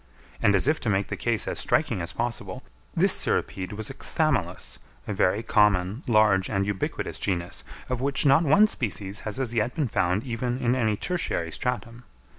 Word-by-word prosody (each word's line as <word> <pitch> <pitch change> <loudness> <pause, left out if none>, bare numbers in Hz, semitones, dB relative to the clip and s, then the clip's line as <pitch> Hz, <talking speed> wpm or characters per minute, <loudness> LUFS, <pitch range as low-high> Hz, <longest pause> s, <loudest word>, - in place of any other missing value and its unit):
And, 100 - +4
as 100 - +2
if 155 +1 +2
to 115 - -2
make 100 0 0
the - - -2
case 115 -2 -1
as - - -3
striking 90 - +1
as 85 0 -3
possible, 115 +4 -4 0.3
this - - +4
cirripede 95 +1 0
was 110 +1 -4
a - - -7
Chthamalus, - - -2 0.3
a 105 - -2
very 100 +3 +1
common, 105 0 +2
large, 105 -4 +4
and 100 -2 0
ubiquitous 100 -1 -3
genus, 90 -3 -2 0.2
of 125 -1 -2
which 140 +2 +1
not 140 +2 +6
one 175 +7 +5
species 105 - -3
has 105 - -5
as 125 -3 -2
yet 115 +2 0
been 150 -5 0
found 95 -1 0
even 120 0 -2
in 125 -2 +1
any 110 -5 +1
tertiary 165 - -2
stratum. 120 +1 -4
110 Hz, 185 wpm, -26 LUFS, 100-125 Hz, 0.3 s, not